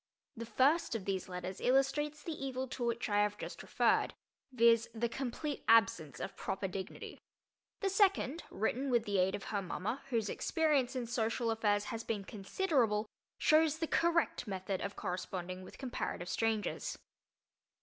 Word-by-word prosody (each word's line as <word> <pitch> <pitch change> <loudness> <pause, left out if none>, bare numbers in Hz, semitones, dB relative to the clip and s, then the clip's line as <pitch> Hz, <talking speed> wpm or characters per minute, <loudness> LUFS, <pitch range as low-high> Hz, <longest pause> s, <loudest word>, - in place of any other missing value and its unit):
The 230 -1 -6
first 270 +5 +3
of 205 -4 -3
these 190 -2 -2
letters 180 +1 -5
illustrates 280 +3 +2
the 335 - -4
evil 265 -3 -3
to 250 - -4
which 235 0 0
I 205 -1 +3
have 210 0 +1
just - - -6
referred, - - +2 0.4
viz., 230 -2 +4
the 235 +1 +1
complete 270 +4 -4
absence 195 - +4
of 195 - -5
proper 195 0 -2
dignity. 190 0 -6 0.6
The 395 - +2
second, 380 -6 +3
written 250 +7 -1
with 240 -2 +2
the 200 -2 +1
aid 185 +1 +3
of 200 - -6
her 205 -2 -2
mama, 195 +7 -3
whose 230 -4 +1
experience 285 -1 +1
in 250 -2 -1
social 230 0 0
affairs 210 -2 +2
has 225 0 -4
been 210 -4 -2
considerable, 220 - 0 0.3
shows 310 0 +4
the 325 - -1
correct 335 -4 +1
method 190 -1 -3
of 200 0 -4
corresponding 185 0 -4
with 185 - -12
comparative 240 -8 -4
strangers. 225 -2 -1
230 Hz, 160 wpm, -34 LUFS, 200-270 Hz, 0.6 s, viz